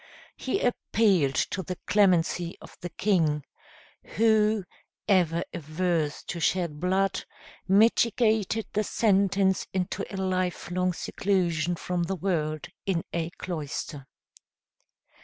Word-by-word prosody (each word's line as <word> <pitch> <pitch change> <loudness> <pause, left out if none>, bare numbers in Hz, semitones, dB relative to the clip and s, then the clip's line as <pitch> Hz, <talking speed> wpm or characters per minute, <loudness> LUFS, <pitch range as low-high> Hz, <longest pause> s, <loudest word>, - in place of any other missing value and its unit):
He 260 - -2
appealed 195 - +2 0.2
to 190 - -2
the 180 +1 -5
clemency 180 -3 +2
of - - -13
the 175 - -4
king, 165 -6 +1 0.7
who, 215 -1 +3 0.4
ever 175 -4 +3
averse 160 -1 -1
to 175 - -5
shed 170 -2 0
blood, 190 +2 +1 0.4
mitigated 220 +1 +3
the 215 - +1
sentence 195 -3 +2
into 185 +1 -1
a 195 - -5
lifelong 185 -1 -1
seclusion 175 -3 0
from 180 +1 -2
the 170 +3 -1
world 155 -5 -2 0.2
in 175 -4 0
a 165 -1 -1
cloister. 145 -4 -5
185 Hz, 105 wpm, -27 LUFS, 170-200 Hz, 0.7 s, who